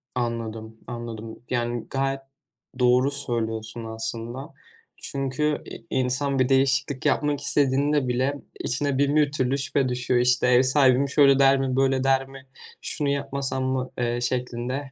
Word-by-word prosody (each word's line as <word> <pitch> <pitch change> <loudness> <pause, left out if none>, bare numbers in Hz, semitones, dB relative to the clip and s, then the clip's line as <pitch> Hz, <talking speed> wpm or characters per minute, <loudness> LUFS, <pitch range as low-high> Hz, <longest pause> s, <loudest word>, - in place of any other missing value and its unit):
Anladım, 115 -2 -4
anladım. 115 -2 -7
Yani 120 -1 -2
gayet 135 0 -1 0.6
doğru 125 +2 +4
söylüyorsun 115 -4 -4
aslında. 115 +5 -6 0.4
Çünkü 140 +2 -2
i - - -10
insan 130 +2 0
bir 130 0 +2
değişiklik 135 0 +1
yapmak 145 -1 +1
istediğinde 140 0 +2
bile 130 +3 -1 0.2
içine 140 +2 -1
bin 140 +1 +2
bir 150 -2 +3
türlü 135 -1 0
şüphe 135 -1 +1
düşüyor. 125 0 +1
İşte, 125 0 +3
ev 125 0 +5
sahibim: 130 0 +3
"Şöyle 140 -1 +5
der 135 0 +5
mi, 130 -1 -1
böyle 135 -1 +2
der 135 0 +2
mi, 135 0 -13 0.4
şunu 145 -2 -1
yapmasam 140 -1 -2
mı?" 130 0 -2
eee, 120 0 -1
şeklinde. 125 +2 -3
130 Hz, 140 wpm, -25 LUFS, 120-140 Hz, 0.6 s, ev